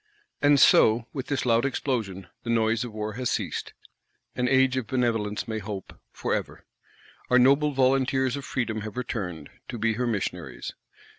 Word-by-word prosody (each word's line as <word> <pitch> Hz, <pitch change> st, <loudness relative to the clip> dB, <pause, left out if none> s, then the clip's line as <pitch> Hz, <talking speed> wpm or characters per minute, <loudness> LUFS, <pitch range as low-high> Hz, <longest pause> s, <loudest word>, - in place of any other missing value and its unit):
And 145 Hz, -1 st, +5 dB
so, 115 Hz, -1 st, +6 dB
with 135 Hz, -3 st, -4 dB
this 140 Hz, -3 st, -1 dB
loud 115 Hz, -1 st, +3 dB
explosion, 115 Hz, -9 st, -2 dB, 0.2 s
the 115 Hz, -, -7 dB
noise 115 Hz, 0 st, +2 dB
of 120 Hz, -, -6 dB
War 105 Hz, 0 st, -4 dB
has 125 Hz, +2 st, -2 dB
ceased; -, -, -3 dB, 0.6 s
an 125 Hz, -, 0 dB
Age 130 Hz, 0 st, +4 dB
of 130 Hz, -4 st, -2 dB
Benevolence 115 Hz, -5 st, -1 dB
may 110 Hz, -1 st, -2 dB
hope, 100 Hz, -2 st, -7 dB, 0.2 s
for -, -, -2 dB
ever. -, -, -4 dB, 0.6 s
Our 125 Hz, -, +5 dB
noble 140 Hz, +4 st, +5 dB
volunteers 130 Hz, 0 st, +2 dB
of 140 Hz, -, -6 dB
Freedom 115 Hz, -5 st, -2 dB
have 110 Hz, +2 st, -7 dB
returned, 90 Hz, -, -4 dB, 0.2 s
to 120 Hz, -, -5 dB
be 115 Hz, 0 st, +1 dB
her 125 Hz, +2 st, -1 dB
missionaries. 110 Hz, -4 st, -3 dB
120 Hz, 165 wpm, -26 LUFS, 110-130 Hz, 0.6 s, so